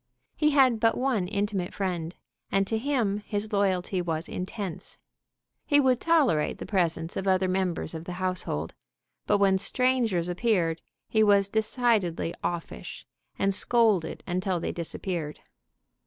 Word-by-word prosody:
He 300 - +3
had 265 -6 +4
but 225 0 +3
one 245 -8 0
intimate 200 -2 -2
friend, 175 -3 -3 0.4
and 195 0 +2
to 220 +2 -1
him 230 -6 0
his 210 +1 -4
loyalty 190 -2 +1
was 165 -1 -2
intense. 185 -1 -6 0.7
He 290 -1 +5
would 260 -3 +3
tolerate 285 - +2
the - - -7
presence 165 -4 -1
of 195 - -3
other 190 0 +3
members 185 -3 -1
of 160 0 -6
the 180 - -5
household, 185 - -3 0.5
but 205 - +4
when 195 -1 +3
strangers 230 -5 +1
appeared 175 -4 0 0.3
he 220 - +2
was 200 -2 +4
decidedly 220 -6 0
offish, 170 -1 -5 0.3
and 195 0 +1
scolded 210 -6 +2
until 185 0 -1
they - - -2
disappeared. 170 -2 -4
195 Hz, 140 wpm, -27 LUFS, 175-220 Hz, 0.7 s, He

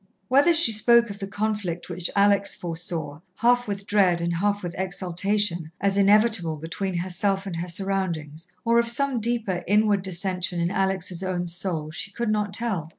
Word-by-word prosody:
Whether 280 +6 +5
she 330 -8 +6
spoke 235 +1 +4
of 200 - -9
the 195 - -5
conflict 205 -4 -3
which 175 -1 -1
Alex 200 0 +3
foresaw, 165 -3 -4 0.2
half 245 +3 +2
with 200 -1 -4
dread 190 -4 +2
and 170 0 -2
half 205 +2 -1
with 175 -1 -5
exultation, 185 -1 -1
as 200 -1 0
inevitable 200 -5 +3
between 175 +5 -4
herself 190 +2 -1
and 185 -4 -5
her 175 +2 -4
surroundings, 170 -4 -3 0.2
or 235 0 +4
of 235 - +1
some 255 +1 +1
deeper, 220 -5 -1
inward 205 0 +3
dissension 185 -1 -1
in 170 +1 0
Alex' 190 -2 -1
own 185 -2 -2
soul, 170 -3 -3
she 180 - -6
could 230 +2 -3
not 210 -1 -1
tell. 200 -6 -2
195 Hz, 170 wpm, -24 LUFS, 175-210 Hz, 0.2 s, she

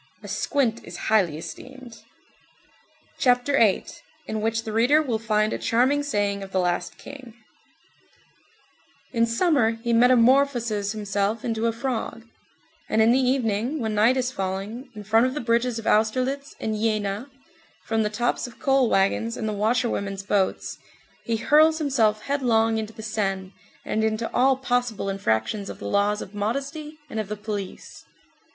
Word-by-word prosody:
A - - -8
squint 245 -6 0
is - - -9 0.2
highly 180 -8 +3
esteemed. 255 +8 -10 1.3
CHAPTER 250 +2 +3
VIII—IN 220 0 -1
WHICH 225 +1 0
THE 220 - -5
READER 245 +7 +4
WILL 250 -8 -1
FIND 215 -1 +1
A - - -3
CHARMING 260 +5 +2
SAYING 205 -8 -1
OF 195 -1 -8
THE 190 - +1
LAST 175 -1 -1
KING 260 -5 -11 1.8
In 230 -2 +2
summer, 230 -3 +2
he 235 -1 0
metamorphoses 240 -3 +3
himself 205 +1 -2
into 225 -1 0
a - - +2
frog; 230 -1 -4 0.7
and 220 - +1
in 220 +1 +5
the 255 - +4
evening, 250 +1 0
when 220 -3 -2
night 225 +5 +4
is 255 0 0
falling, 195 +5 -4
in 210 - -8
front 225 +4 +3
of 260 - -4
the - - -2
bridges 235 0 +1
of 225 - -6
Austerlitz 255 +6 +1
and 220 - -2
Jena, 215 +2 -1 0.6
from 225 0 0
the 210 - +1
tops 240 +4 -1
of 240 - -14
coal 270 -5 +2
wagons, 225 +4 +1
and 220 - -3
the 215 - -1
washerwomen's 210 -2 -1
boats, 195 -1 -1 0.5
he 230 -1 0
hurls 310 +6 +4
himself 230 -8 +1
headlong 225 -5 +1
into 220 0 -5
the 220 - -10
Seine, 195 -3 -2 0.3
and 220 - -1
into 220 +1 -1
all 265 +1 +3
possible 245 -5 -1
infractions 195 - -1
of - - -7
the - - -7
laws 205 +1 +1
of 190 - -13
modesty 280 +9 -4
and 225 - -5
of 215 - -3
the 210 +1 -5
police. 205 -2 -6
225 Hz, 160 wpm, -24 LUFS, 210-255 Hz, 1.8 s, in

